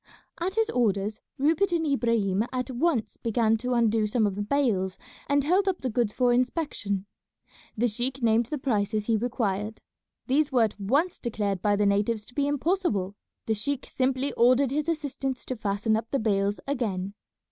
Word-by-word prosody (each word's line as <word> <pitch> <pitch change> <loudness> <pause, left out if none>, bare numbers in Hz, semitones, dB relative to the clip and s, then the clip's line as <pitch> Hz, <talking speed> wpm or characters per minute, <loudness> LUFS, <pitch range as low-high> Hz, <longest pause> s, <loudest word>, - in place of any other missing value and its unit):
At 365 +3 -2
his 450 -1 +1
orders 210 -3 0 0.2
Rupert 320 +7 +2
and 335 -2 +1
Ibrahim 230 -8 +1
at 255 0 -3
once 255 -2 0
began 225 -1 +2
to 250 +3 -2
undo 225 -2 +2
some 220 +1 +1
of 205 - 0
the 205 - -4
bales 205 -6 0 0.3
and 285 0 +3
held 370 +7 +2
up 375 -2 0
the 255 - -2
goods 230 -2 +1
for 245 +1 +2
inspection. 245 - -1 0.7
The 240 +3 +3
sheik 245 +4 -2
named 225 0 +3
the 300 - -3
prices 215 -5 0
he 230 - +2
required. 215 -2 -2 0.5
These 285 +3 +2
were 250 -3 +4
at 215 -1 -2
once 280 - +1
declared 205 -5 -2
by 205 -1 +2
the 205 0 +2
natives 210 +2 +1
to - - -17
be 285 +1 0
impossible. 290 - 0 0.3
The 220 - +1
sheik 255 +6 -2
simply 265 +1 -1
ordered 255 +2 +4
his 300 +3 -1
assistants 280 -5 -3
to 255 - -3
fasten 210 0 0
up 225 +1 -3
the 275 - 0
bales 205 -3 0
again. 205 -9 -2
235 Hz, 180 wpm, -27 LUFS, 210-275 Hz, 0.7 s, were